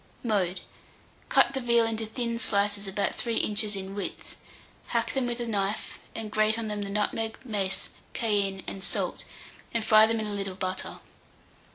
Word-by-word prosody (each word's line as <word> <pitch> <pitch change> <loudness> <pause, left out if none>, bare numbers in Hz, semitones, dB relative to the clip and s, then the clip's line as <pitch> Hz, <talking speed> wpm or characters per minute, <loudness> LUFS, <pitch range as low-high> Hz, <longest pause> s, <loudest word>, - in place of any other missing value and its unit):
Mode. 195 -6 +1 0.7
Cut - - +5
the 265 - -1
veal 235 -1 +4
into 225 -1 -2
thin 235 +1 -2
slices 205 -1 +1
about 195 +1 0
3 235 -1 -2
inches 210 -1 +2
in 195 0 -5
width; 200 -1 -5 0.5
hack - - 0
them 265 -2 +1
with 240 0 -2
a 240 - -1
knife, 205 -2 -1 0.2
and 220 -2 -4
grate 215 +1 +3
on 225 -2 -2
them 210 -1 -2
the 200 - -3
nutmeg, 220 +2 0
mace, 200 -5 -1 0.2
cayenne, 200 -4 +1
and 190 - -5
salt, - - -1 0.5
and 225 -1 +1
fry 215 0 +8
them 225 0 +1
in 215 - -1
a 210 - -3
little 195 -2 -3
butter. 185 0 -4
210 Hz, 175 wpm, -28 LUFS, 200-225 Hz, 0.7 s, fry